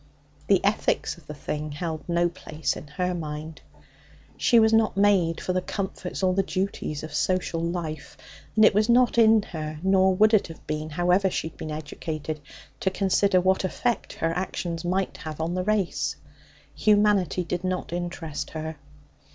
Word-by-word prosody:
The - - +3
ethics - - +1
of - - -24
the 150 - -7
thing 150 +1 -4
held 160 +1 -5
no 170 0 +3
place 160 -3 -3
in 150 - -9
her 180 +5 -2
mind. 155 -1 -6 0.7
She 235 - +4
was 220 0 +4
not 220 -3 +3
made 195 -5 +3
for 185 - -2
the 185 - +1
comforts 190 -1 -4
or 185 -1 +3
the 195 - +3
duties 185 -6 -3
of 155 -1 -7
social 165 +2 0
life, 165 -4 -4 0.4
and 215 -1 +7
it - - +6
was 210 +3 +2
not 240 0 +4
in 220 -2 +6
her 155 -4 -6
nor 190 0 +4
would 215 +3 +4
it 215 - +4
have 165 -2 -12
been, 155 +1 -3
however 180 +4 +2
she 160 - -2
had - - -23
been 155 - -6
educated 155 0 -5 0.4
to 190 - +1
consider 190 0 +2
what 190 +1 +2
effect 235 +6 -1
her 165 0 -1
actions 175 -2 -3
might 185 +2 -1
have 155 -1 -7
on 165 +2 -1
the 185 0 -1
race. 205 -2 0 0.6
Humanity 205 -5 +3
did 175 +1 -3
not 185 -2 -2
interest 175 -3 -4
her. 160 -1 -5
180 Hz, 175 wpm, -26 LUFS, 160-195 Hz, 0.7 s, and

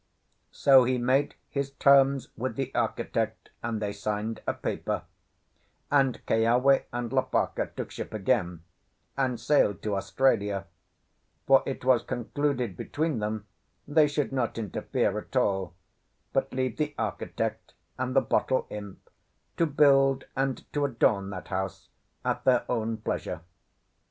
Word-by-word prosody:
So 135 -2 +6
he 125 +1 +1
made 130 +4 +1
his 140 -1 -2
terms 140 -1 +4
with 130 +3 -3
the 135 -1 -3
architect, - - -2
and 115 -1 -2
they 105 -1 -2
signed 105 +2 -3
a - - +2
paper; - - -3 0.9
and 135 -4 +2
Keawe 120 +5 +3
and 120 -1 -3
Lopaka - - 0
took - - -5
ship - - -6
again 95 -6 0 0.5
and 130 -4 0
sailed 120 -4 +2
to 105 -2 -1
Australia; 100 -2 +1 0.8
for 135 0 +6
it 135 -2 -4
was 130 -3 +5
concluded 125 -2 -2
between 155 - -2
them 105 0 -3 0.4
they 150 +1 +5
should 145 -1 -1
not 130 -4 -1
interfere 105 -5 -1
at - - -13
all, 95 -3 +1 0.6
but - - 0
leave 130 -2 -2
the 150 -1 -2
architect 110 -3 -3 0.2
and 130 0 -2
the 135 - +6
bottle 130 - +1
imp 100 -2 -8 0.5
to 165 - +3
build 135 -2 +4
and 135 -1 -1
to 145 - 0
adorn 110 -7 +2
that 95 -2 -7
house 95 -1 -4 0.4
at - - -1
their 125 -2 +3
own 115 -2 -1
pleasure. 110 -6 -4
125 Hz, 135 wpm, -28 LUFS, 105-135 Hz, 0.9 s, So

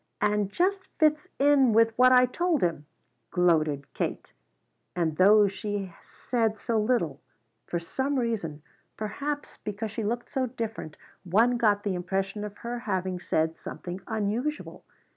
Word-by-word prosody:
"And 210 -1 +1
just 380 - 0
fits 305 -1 +3
in 275 -4 +4
with 225 0 +4
what 255 +1 +6
I 250 0 +7
told 335 +4 0
him!" 165 -4 -1 0.4
gloated 155 -5 +1
Kate. - - -4 0.6
And 165 -3 0
though 205 +2 +6
she 200 -2 -4
said 225 -3 -2
so 225 +2 0
little, 210 - 0 0.5
for 170 - -1
some 265 +11 -2
reason, 200 - -2 0.3
perhaps 285 +8 -4
because 210 +1 -5
she 220 +1 -4
looked 235 +3 -3
so 260 -1 0
different, 225 -9 -6 0.3
one 225 +7 +3
got 210 -4 +2
the 200 - -1
impression 190 +3 -2
of 205 -1 -7
her 240 +1 -3
having 185 -5 -2
said 160 -1 0
something 180 +2 -7
unusual. 225 +7 -2
215 Hz, 140 wpm, -27 LUFS, 185-245 Hz, 0.6 s, I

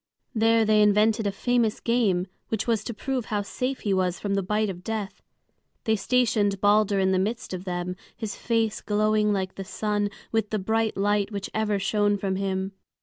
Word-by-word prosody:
There 225 -1 +3
they 215 0 +4
invented 210 +1 +3
a - - +1
famous 235 +1 +1
game, 215 -7 +1 0.2
which 220 -1 -2
was 225 -3 +1
to 235 - -3
prove 260 0 -2
how 210 -3 -1
safe 255 +6 -3
he 200 - 0
was 185 -1 0
from 200 -1 -2
the 195 - +1
bite 210 +2 0
of 180 -1 -10
death. 215 -2 -4 0.6
They 220 - +2
stationed 215 -3 +1
Balder 205 0 +3
in 190 -1 +2
the 185 - +2
midst 210 +2 -2
of 185 +1 -5
them, 180 0 -3 0.2
his 220 -2 -4
face 225 -2 0
glowing 215 0 +2
like 190 -2 -1
the 195 - -6
sun 205 +1 -1 0.2
with 220 -2 0
the 215 - 0
bright 220 +2 0
light 205 +1 +1
which 200 -1 -5
ever 215 -1 +1
shone 205 +1 +1
from 190 -1 -2
him. 190 0 -2
210 Hz, 195 wpm, -26 LUFS, 195-220 Hz, 0.6 s, they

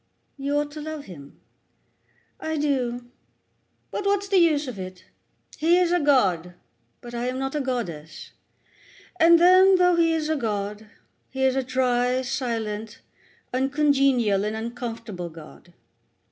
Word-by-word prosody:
"You 280 +1 -2
ought 295 0 -1
to 305 +1 -8
love 310 -1 -6
him." 145 -6 -13 1.0
"I 315 0 -3
do; 245 -4 -2 0.8
but - - -3
what's 400 0 0
the 390 -1 +3
use 305 -4 +3
of 235 -6 -7
it? 185 0 -8 0.5
He 335 +3 +4
is 360 -1 +2
a 355 - +3
god, 190 - +2 0.5
but 240 0 -10
I 240 +1 -2
am 255 +1 -3
not 270 0 -3
a 300 - -1
goddess; 195 - -5 0.9
and 335 +1 +7
then, 370 +2 +6
though 360 -1 +4
he 330 -1 +3
is 320 -2 -1
a 315 - 0
god, 210 -4 -3 0.4
he 265 0 -3
is 265 -1 +3
a 270 - +1
dry, 255 0 0
silent, 225 -4 -4 0.5
uncongenial 270 -6 +2
and 210 +1 -2
uncomfortable 225 -5 -6
god. 165 +1 -14
255 Hz, 145 wpm, -24 LUFS, 220-300 Hz, 1.0 s, and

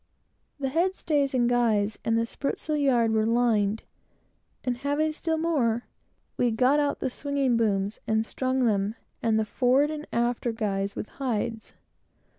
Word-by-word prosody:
The 270 -1 -1
head 350 +7 +1
stays 285 -6 0
and 240 -2 +3
guys, 220 -4 +1
and 225 0 +1
the 230 - +1
spritsail 285 +5 -3
yard, 250 -6 +3
were 220 -1 +2
lined, 225 -3 +2 0.8
and, 250 -2 -1
having 290 +4 0
still 320 +1 -2
more, 260 -8 +1 0.5
we 245 - +2
got 255 +6 +3
out 290 -1 0
the - - 0
swinging 280 -2 0
booms, 205 -2 0
and 220 0 +1
strung 260 +1 0
them 205 -1 +1 0.3
and 225 -1 +2
the 220 - 0
forward 260 +6 +2
and 305 0 -6
after 240 0 0
guys, 200 -3 -2
with - - -4
hides. 230 -4 -3
240 Hz, 155 wpm, -27 LUFS, 220-280 Hz, 0.8 s, and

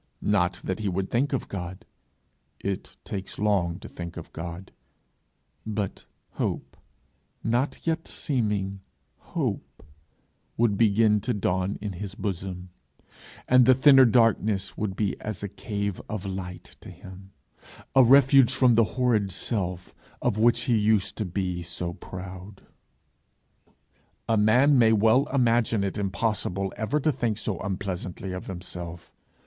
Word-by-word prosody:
Not 95 -3 +1
that 95 +1 -3
he 105 -2 -1
would 95 +1 -2
think 130 +5 +1
of 135 - -2
God! 90 -1 -6 0.7
it 100 -1 -5
takes 95 -1 -6
long 95 -5 +1
to - - -8
think 85 -1 -8
of - - -9
God; 85 +3 -7 0.9
but 105 -3 -4 0.3
hope, - - -3 0.7
not 120 +5 -1
yet 165 0 -1
seeming 105 -7 -2 0.4
hope, - - -4 0.7
would 115 -3 +3
begin 105 0 +3
to 120 +2 -1
dawn 95 -1 -1
in 105 -2 -4
his 100 +2 -6
bosom, 95 -3 -5 0.8
and 125 -1 +6
the 130 - +7
thinner 135 0 +7
darkness 110 -4 +2
would 105 -3 -3
be 100 -1 -2
as 105 -2 -5
a - - -1
cave 100 -1 -4
of 105 -2 -4
light, 95 -2 -6 1.2
a 135 - +7
refuge 135 0 +6
from 130 -2 +4
the 115 0 +5
horrid 115 -6 +2
self 90 -2 -3 0.3
of 110 -4 0
which 120 +1 +4
he 120 -1 +1
used 105 -2 +2
to 110 - -2
be 90 -1 -2
so 85 0 -4
proud. 95 +2 -9 1.6
A 115 - +2
man 125 +7 +5
may 110 -1 +5
well 110 +5 +4
imagine 115 -5 +2
it 95 - -2
impossible 100 -1 -1
ever 125 +7 -1
to 155 +2 +2
think 115 -6 -1
so 95 -6 -3
unpleasantly 95 -1 -4
of 90 0 -6
himself! 90 -2 -7
105 Hz, 135 wpm, -26 LUFS, 95-115 Hz, 1.6 s, the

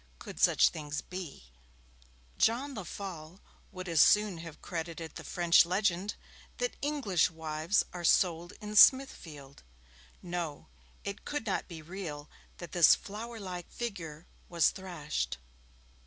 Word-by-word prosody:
Could - - -10
such - - +5
things 150 -1 -5
be? 165 - -8 0.9
John 260 +5 +2
Lefolle 185 -4 -7 0.3
would 185 0 -7
as 165 -3 +4
soon 210 -4 +4
have 165 -2 -9
credited 165 -2 -5
the - - -8
French 175 -1 +4
legend 185 +2 0 0.4
that - - -2
English 270 - +1
wives 160 +3 0
are 175 -1 -6
sold 170 0 +2
in 210 0 -7
Smithfield. 160 - +4 0.6
No! 170 -4 -4 0.4
it 200 +1 -6
could 295 -5 -4
not 200 - -1
be 165 -3 -9
real 155 -4 -7 0.3
that 175 - -9
this 175 -3 +7
flower 225 +3 -8
like 180 -3 -6
figure 175 -9 -6 0.2
was 170 -3 +3
thrashed. 175 - -4
175 Hz, 125 wpm, -31 LUFS, 160-200 Hz, 0.9 s, this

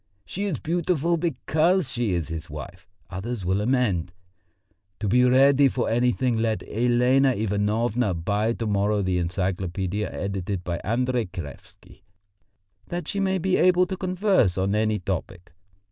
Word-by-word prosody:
'She 200 +3 -4
is 180 -10 -2
beautiful 170 0 0
because 165 +1 +1
she 120 -4 -1
is 85 -2 -2
his 80 0 -6
wife,' 75 -2 -9 0.2
others 100 +2 -4
will 95 +3 +1
amend. 105 -8 0 0.9
To 105 - -2
be 125 +5 +4
ready 135 +2 +5
for 130 -2 -1
anything 125 +1 +1
let 110 -1 0
Elena 125 +3 +3
Ivanovna 105 +1 0
buy 100 +7 0
to 115 - -4
morrow 105 0 +1
the 90 -1 0
Encyclopædia 95 +2 -2
edited 100 -1 -3
by 85 -1 -3
Andrey 120 +2 -1
Kraevsky, 85 -5 -11 0.9
that 175 -2 -5
she 200 - -2
may 190 -1 +1
be 185 +1 +1
able 180 0 +4
to 190 +1 -4
converse 185 - +1
on 95 +1 0
any 110 0 +1
topic. 90 -2 -5
115 Hz, 145 wpm, -25 LUFS, 95-135 Hz, 0.9 s, ready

